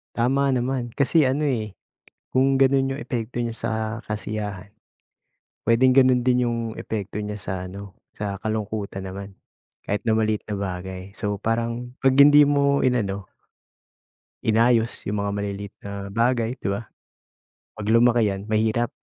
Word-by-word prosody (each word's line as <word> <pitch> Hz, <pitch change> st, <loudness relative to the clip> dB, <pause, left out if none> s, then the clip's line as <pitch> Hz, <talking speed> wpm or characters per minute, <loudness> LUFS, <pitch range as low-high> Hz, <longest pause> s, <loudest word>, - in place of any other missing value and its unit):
Tama 135 Hz, +3 st, +2 dB
naman 125 Hz, -1 st, -1 dB
kasi 140 Hz, +2 st, +3 dB
ano, 135 Hz, +3 st, +1 dB
eh, 110 Hz, -6 st, -2 dB, 0.6 s
kung 135 Hz, +1 st, +3 dB
gano'n 135 Hz, 0 st, +3 dB
yung 145 Hz, -, -6 dB
epekto 120 Hz, -2 st, -3 dB
niya 120 Hz, -, -2 dB
sa 115 Hz, 0 st, -3 dB, 0.4 s
kasiyahan, 105 Hz, -2 st, -4 dB, 0.9 s
puwedeng 125 Hz, +3 st, +4 dB
gano'n 130 Hz, -1 st, +6 dB
din 125 Hz, 0 st, +2 dB
yung 120 Hz, -1 st, -1 dB, 0.2 s
epekto 105 Hz, -3 st, -5 dB
niya 105 Hz, 0 st, -5 dB
sa 90 Hz, -, -5 dB
ano 100 Hz, +1 st, -9 dB, 0.2 s
sa 100 Hz, -1 st, -4 dB
kalungkutan 105 Hz, -2 st, -4 dB
naman, 100 Hz, +1 st, -7 dB, 0.6 s
kahit 105 Hz, -, -1 dB
na 115 Hz, -, +2 dB
maliit 110 Hz, -1 st, +1 dB
na 105 Hz, -, -6 dB
bagay 95 Hz, 0 st, -5 dB
so, 105 Hz, -2 st, -3 dB
parang 115 Hz, +3 st, -2 dB
pag 135 Hz, -, +6 dB
hindi 145 Hz, +1 st, +8 dB
mo 140 Hz, 0 st, +2 dB
inano, 100 Hz, -6 st, 0 dB, 1.2 s
inayos 115 Hz, +1 st, +2 dB
yung 100 Hz, 0 st, -1 dB
mga 100 Hz, -, -1 dB
maliliit 100 Hz, 0 st, -4 dB
na -, -, -5 dB, 0.2 s
bagay 115 Hz, +3 st, +1 dB
di -, -, -6 dB
ba? 100 Hz, +2 st, -1 dB, 1.0 s
Pag 110 Hz, -, -5 dB
lumaki 115 Hz, -3 st, +4 dB
yan 100 Hz, +2 st, -8 dB
mahirap. 110 Hz, +2 st, +1 dB
115 Hz, 145 wpm, -24 LUFS, 100-125 Hz, 1.2 s, hindi